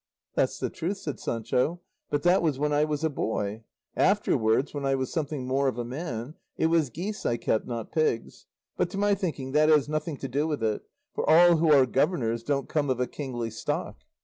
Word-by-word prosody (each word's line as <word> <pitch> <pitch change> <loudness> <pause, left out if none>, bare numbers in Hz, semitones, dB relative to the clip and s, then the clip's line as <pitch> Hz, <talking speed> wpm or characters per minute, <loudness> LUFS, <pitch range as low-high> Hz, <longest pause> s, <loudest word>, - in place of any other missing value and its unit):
"That's - - +1
the - - -3
truth," 190 +5 -3
said 150 -7 -5
Sancho; 125 +9 -1 0.3
"but 145 -1 -1
that 175 +2 +4
was 155 -5 +1
when 150 +1 0
I 150 +1 +3
was 150 0 -3
a 160 - +2
boy; 110 -4 -2 0.3
afterwards 110 +6 +2
when 145 -1 -4
I 135 0 +2
was 130 -1 -3
something 150 -4 -2
more 135 +2 +1
of 130 - -1
a 120 - -2
man 125 -1 -5 0.2
it - - +1
was 160 -5 +3
geese 195 - -5
I 120 - +1
kept, 110 - 0
not 115 -3 -5
pigs. 155 -8 -1 0.3
But - - +1
to - - -6
my 205 0 +3
thinking 155 -9 -3
that 155 +2 +4
has 150 -3 +5
nothing 155 0 -2
to 135 - -5
do 145 +5 0
with 150 -7 -2
it; 110 -1 0 0.3
for - - -1
all 170 +1 +7
who 160 0 +3
are 140 -3 +7
governors 125 -4 0
don't 140 +1 -1
come 145 -3 0
of 130 -1 0
a 125 - +2
kingly 120 -5 -5
stock." 110 - -3
145 Hz, 215 wpm, -27 LUFS, 125-155 Hz, 0.3 s, all